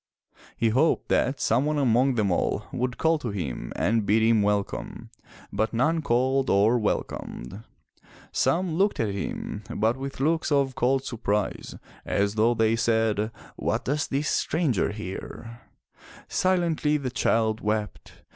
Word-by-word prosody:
He 115 Hz, -, +2 dB
hoped 135 Hz, +9 st, +2 dB
that 135 Hz, +3 st, +1 dB
some 120 Hz, +4 st, +2 dB
one 150 Hz, 0 st, 0 dB
among 130 Hz, -1 st, +3 dB
them 105 Hz, -4 st, +1 dB
all 85 Hz, -, 0 dB
would 125 Hz, -2 st, -2 dB
call 160 Hz, 0 st, +2 dB
to 125 Hz, -, -4 dB
him 70 Hz, -, -4 dB
and 115 Hz, 0 st, +1 dB
bid 105 Hz, +2 st, +3 dB
him 110 Hz, -1 st, +4 dB
welcome, 100 Hz, -1 st, -2 dB, 0.4 s
but 110 Hz, +3 st, -1 dB
none 160 Hz, +7 st, +2 dB
called 130 Hz, +1 st, +1 dB
or 110 Hz, +5 st, +4 dB
welcomed. 100 Hz, -, -4 dB, 0.7 s
Some 180 Hz, -1 st, +1 dB
looked 200 Hz, +2 st, +2 dB
at 105 Hz, -3 st, 0 dB
him, 100 Hz, +1 st, -4 dB
but 110 Hz, +4 st, 0 dB
with 135 Hz, 0 st, -6 dB
looks 160 Hz, +3 st, +1 dB
of 140 Hz, -2 st, +2 dB
cold 130 Hz, +2 st, +1 dB
surprise 105 Hz, -4 st, -2 dB, 0.3 s
as 100 Hz, 0 st, 0 dB
though 110 Hz, +2 st, +2 dB
they 110 Hz, 0 st, +2 dB
said, 110 Hz, -2 st, +1 dB, 0.3 s
What -, -, -1 dB
does 145 Hz, +2 st, 0 dB
this 140 Hz, +2 st, -1 dB
stranger 150 Hz, -, +1 dB
here?" 110 Hz, +3 st, -8 dB, 0.7 s
Silently 170 Hz, -5 st, +1 dB
the 135 Hz, -4 st, -4 dB
child 110 Hz, -3 st, +1 dB
wept. 105 Hz, -, -4 dB
115 Hz, 145 wpm, -26 LUFS, 105-140 Hz, 0.7 s, him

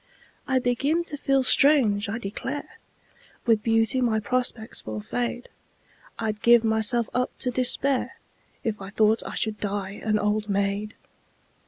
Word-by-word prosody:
I 260 Hz, -, +2 dB
begin 270 Hz, +7 st, 0 dB
to 315 Hz, -, -5 dB
feel 275 Hz, -2 st, +1 dB
strange, 255 Hz, -8 st, +4 dB
I 220 Hz, -, -3 dB
declare! 270 Hz, -, -6 dB, 0.7 s
With 225 Hz, -3 st, +3 dB
beauty 225 Hz, +2 st, +1 dB
my 225 Hz, -3 st, +1 dB
prospects 240 Hz, -1 st, -1 dB
will 110 Hz, 0 st, -5 dB
fade 245 Hz, -, -4 dB, 0.7 s
I'd 215 Hz, -2 st, -3 dB
give 235 Hz, -1 st, +6 dB
myself 220 Hz, +1 st, +2 dB
up 250 Hz, 0 st, 0 dB
to 250 Hz, -, 0 dB
despair 255 Hz, +2 st, +1 dB, 0.5 s
If 215 Hz, -3 st, -3 dB
I 195 Hz, -, -7 dB
thought 215 Hz, +2 st, +2 dB
I -, -, -6 dB
should 215 Hz, -1 st, -2 dB
die 200 Hz, -1 st, -4 dB
an 215 Hz, -1 st, +1 dB
old 210 Hz, 0 st, -1 dB
maid! 200 Hz, +2 st, -1 dB
225 Hz, 145 wpm, -25 LUFS, 210-250 Hz, 0.7 s, give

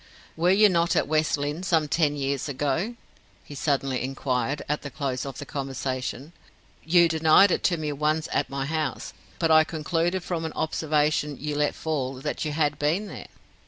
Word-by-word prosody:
"Were 170 Hz, +2 st, +2 dB
you 205 Hz, +3 st, +6 dB
not 170 Hz, -3 st, +2 dB
at -, -, +2 dB
West 155 Hz, 0 st, +1 dB
Lynne 145 Hz, +3 st, -3 dB
some 165 Hz, -5 st, +1 dB
ten 150 Hz, -1 st, +1 dB
years 140 Hz, 0 st, -2 dB
ago?" 145 Hz, -, -1 dB, 0.5 s
he -, -, -11 dB
suddenly 135 Hz, -2 st, -1 dB
inquired, 130 Hz, +1 st, -2 dB
at 150 Hz, +1 st, -1 dB
the 140 Hz, -, -6 dB
close 135 Hz, -2 st, -3 dB
of 135 Hz, -, -7 dB
the 145 Hz, -, -6 dB
conversation. 135 Hz, +1 st, -4 dB, 0.5 s
"You 170 Hz, +1 st, +5 dB
denied 160 Hz, +4 st, +5 dB
it -, -, 0 dB
to 175 Hz, -, +2 dB
me 155 Hz, -2 st, -3 dB
once 150 Hz, +2 st, 0 dB
at -, -, 0 dB
my 135 Hz, 0 st, -3 dB
house; 155 Hz, -2 st, -3 dB, 0.2 s
but 165 Hz, -2 st, +1 dB
I 155 Hz, 0 st, +7 dB
concluded 165 Hz, +3 st, -1 dB
from 170 Hz, -2 st, -3 dB
an 160 Hz, -, -4 dB
observation 150 Hz, -2 st, 0 dB
you 150 Hz, 0 st, -3 dB
let 150 Hz, 0 st, +1 dB
fall, 135 Hz, -5 st, -2 dB
that 130 Hz, -, -4 dB
you 155 Hz, -, -2 dB
had 150 Hz, -1 st, 0 dB
been 170 Hz, +8 st, 0 dB
here." -, -, -8 dB
150 Hz, 185 wpm, -26 LUFS, 140-160 Hz, 0.5 s, I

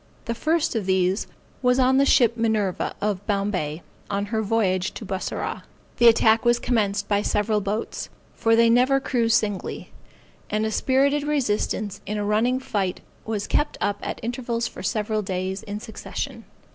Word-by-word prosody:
The 235 Hz, -, -1 dB
first 320 Hz, +6 st, 0 dB
of 215 Hz, -5 st, -2 dB
these 190 Hz, +1 st, +1 dB, 0.3 s
was 250 Hz, -1 st, +3 dB
on 260 Hz, 0 st, +4 dB
the 275 Hz, +1 st, +4 dB
ship 235 Hz, -3 st, +4 dB
Minerva, 220 Hz, -5 st, 0 dB
of 205 Hz, -2 st, -1 dB
Bombay, 195 Hz, -7 st, -1 dB, 0.3 s
on 200 Hz, 0 st, -1 dB
her 220 Hz, -, +2 dB
voyage 195 Hz, -4 st, 0 dB
to 220 Hz, -, -7 dB
Bussorah. 190 Hz, 0 st, -3 dB, 0.4 s
The 240 Hz, -, +6 dB
attack 225 Hz, -1 st, +5 dB
was 240 Hz, 0 st, +4 dB
commenced 205 Hz, -5 st, 0 dB
by 205 Hz, -1 st, +2 dB
several 210 Hz, 0 st, +1 dB
boats, 205 Hz, +3 st, -3 dB, 0.2 s
(for 225 Hz, -1 st, +2 dB
they 230 Hz, 0 st, +5 dB
never 250 Hz, +4 st, +4 dB
cruize 235 Hz, -4 st, +1 dB
singly,) 205 Hz, -3 st, -2 dB, 0.6 s
and 215 Hz, +1 st, 0 dB
a 220 Hz, -, -1 dB
spirited 275 Hz, +5 st, +2 dB
resistance 215 Hz, -8 st, -1 dB
in 210 Hz, +2 st, -2 dB
a 205 Hz, -, -1 dB
running 225 Hz, +5 st, +2 dB
fight 200 Hz, -8 st, -2 dB, 0.2 s
was 215 Hz, -2 st, -2 dB
kept 295 Hz, -, 0 dB
up 205 Hz, 0 st, -1 dB
at -, -, -4 dB
intervals 235 Hz, 0 st, -2 dB
for -, -, -9 dB
several 215 Hz, -1 st, -1 dB
days 190 Hz, 0 st, -3 dB
in 205 Hz, 0 st, -6 dB
succession. 220 Hz, -, -6 dB
220 Hz, 165 wpm, -24 LUFS, 205-240 Hz, 0.6 s, The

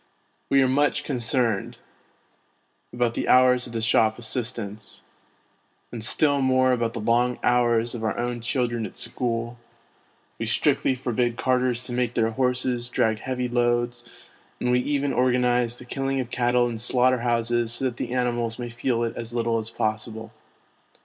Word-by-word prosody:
We 135 Hz, -1 st, +5 dB
are -, -, +3 dB
much 145 Hz, +2 st, +1 dB
concerned 120 Hz, -5 st, -1 dB, 1.1 s
about 120 Hz, -1 st, 0 dB
the -, -, -3 dB
hours 125 Hz, 0 st, +5 dB
of 120 Hz, -, -11 dB
the 115 Hz, -1 st, -2 dB
shop 110 Hz, -1 st, +3 dB
assistants, 110 Hz, -3 st, -4 dB, 0.9 s
and 115 Hz, -2 st, -5 dB
still 145 Hz, +4 st, +2 dB
more 130 Hz, 0 st, +3 dB
about 120 Hz, -2 st, 0 dB
the -, -, -3 dB
long 120 Hz, +3 st, +1 dB
hours 120 Hz, -1 st, +2 dB
of 115 Hz, -2 st, -5 dB
our 110 Hz, -, -1 dB
own 120 Hz, 0 st, -2 dB
children 120 Hz, -2 st, -1 dB
at -, -, -14 dB
school; 120 Hz, -1 st, -3 dB, 0.8 s
we -, -, -2 dB
strictly 130 Hz, -, +2 dB
forbid 120 Hz, -2 st, -1 dB
carters 125 Hz, -1 st, +1 dB
to 125 Hz, -, -7 dB
make 120 Hz, -1 st, -1 dB
their 115 Hz, -1 st, +2 dB
horses 125 Hz, 0 st, 0 dB
drag 110 Hz, -3 st, +1 dB
heavy 125 Hz, +1 st, -2 dB
loads, 120 Hz, 0 st, 0 dB, 0.5 s
and 125 Hz, -, 0 dB
we 125 Hz, -, +4 dB
even 140 Hz, +1 st, -1 dB
organise 125 Hz, -1 st, +2 dB
the 125 Hz, -, -10 dB
killing 135 Hz, +1 st, -2 dB
of 125 Hz, -2 st, -4 dB
cattle 120 Hz, 0 st, +2 dB
in 115 Hz, -2 st, -5 dB
slaughter 125 Hz, +2 st, +2 dB
houses 120 Hz, -1 st, 0 dB
so 135 Hz, -, -2 dB
that 125 Hz, -2 st, -2 dB
the -, -, -4 dB
animals 120 Hz, -2 st, -1 dB
may 120 Hz, -1 st, -5 dB
feel 120 Hz, 0 st, -1 dB
it 115 Hz, -, -3 dB
as 115 Hz, 0 st, -6 dB
little 115 Hz, -1 st, +1 dB
as 110 Hz, 0 st, -5 dB
possible. 110 Hz, 0 st, -3 dB
120 Hz, 165 wpm, -24 LUFS, 115-125 Hz, 1.1 s, We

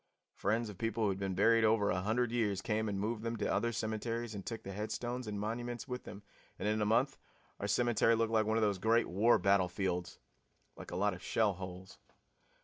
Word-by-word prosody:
Friends 110 Hz, +4 st, 0 dB
of 105 Hz, -4 st, -9 dB
people 115 Hz, 0 st, -1 dB
who 105 Hz, -, +3 dB
had 95 Hz, 0 st, -2 dB
been 95 Hz, -1 st, -2 dB
buried 115 Hz, +4 st, +4 dB
over 110 Hz, -2 st, +3 dB
a 90 Hz, -, 0 dB
hundred 115 Hz, +4 st, 0 dB
years 105 Hz, -5 st, 0 dB
came 110 Hz, -1 st, 0 dB
and 100 Hz, -1 st, -2 dB
moved 110 Hz, +2 st, -2 dB
them 115 Hz, +1 st, -2 dB
to -, -, -2 dB
other 120 Hz, -, +1 dB
cemeteries 115 Hz, +1 st, -3 dB
and 100 Hz, -2 st, -6 dB
took 115 Hz, +2 st, -6 dB
the 100 Hz, -, -6 dB
headstones 115 Hz, +4 st, -4 dB
and 105 Hz, -1 st, -3 dB
monuments 120 Hz, +4 st, -4 dB
with 125 Hz, -1 st, -5 dB
them, 100 Hz, -, -9 dB, 0.3 s
and -, -, -2 dB
in 110 Hz, 0 st, +1 dB
a 105 Hz, -, +2 dB
month 125 Hz, +5 st, +2 dB, 0.4 s
our 100 Hz, -, -2 dB
cemetery 115 Hz, +1 st, +3 dB
looked 115 Hz, 0 st, 0 dB
like 110 Hz, -1 st, +3 dB
one 110 Hz, +1 st, +2 dB
of 115 Hz, -, +2 dB
those 100 Hz, -3 st, +1 dB
Great 115 Hz, +3 st, +3 dB
War 110 Hz, +7 st, +4 dB
battlefields 95 Hz, -2 st, 0 dB, 0.6 s
like -, -, -10 dB
a -, -, -5 dB
lot 100 Hz, +2 st, +1 dB
of 90 Hz, -, -9 dB
shell 105 Hz, +1 st, +1 dB
holes. 95 Hz, 0 st, -9 dB
110 Hz, 220 wpm, -34 LUFS, 100-115 Hz, 0.6 s, buried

